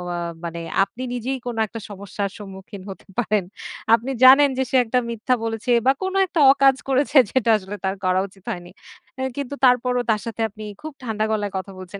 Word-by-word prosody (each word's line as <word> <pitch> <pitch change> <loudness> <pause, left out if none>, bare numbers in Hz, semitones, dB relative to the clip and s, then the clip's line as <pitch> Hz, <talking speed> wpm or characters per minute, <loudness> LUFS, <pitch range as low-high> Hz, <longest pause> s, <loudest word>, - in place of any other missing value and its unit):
আ - - -3 0.3
মানে 170 0 -5 0.2
আপনি 230 +5 -8
নিজেই 250 +2 -2
কোন 245 -1 -3
একটা 225 - -8
সমস্যার 200 0 -4
সম্মুখীন 195 -1 -10
হতে 195 - -10
পারেন। 215 -4 +1 0.5
আপনি 235 +4 +2
জানেন 275 +3 +8
যে 265 - +2
সে - - -2
একটা 250 +3 +1
মিথ্যা 235 +2 -1
বলেছে 225 +1 -2
বা 265 - +6
কোন 375 0 -2
একটা 345 -2 -3
অকাজ 275 -1 +4
করেছে 275 +2 +2
যেটা 250 -3 +1
আসলে 200 0 -7
তার 190 +1 0
করা 185 0 +3
উচিত 195 -1 -22
হয়নি। 175 0 -7 0.5
এ - - -1
কিন্তু 280 0 -4
তারপরও 250 0 +3
তার 215 -2 +2
সাথে 230 -1 -5
আপনি 215 +1 -11 0.2
খুব 310 0 -7
ঠান্ডা 220 -3 -1
গলায় 205 -2 -1
কথা 190 +1 -6
বলছেন। 185 +2 -9
225 Hz, 195 wpm, -22 LUFS, 200-255 Hz, 0.5 s, জানেন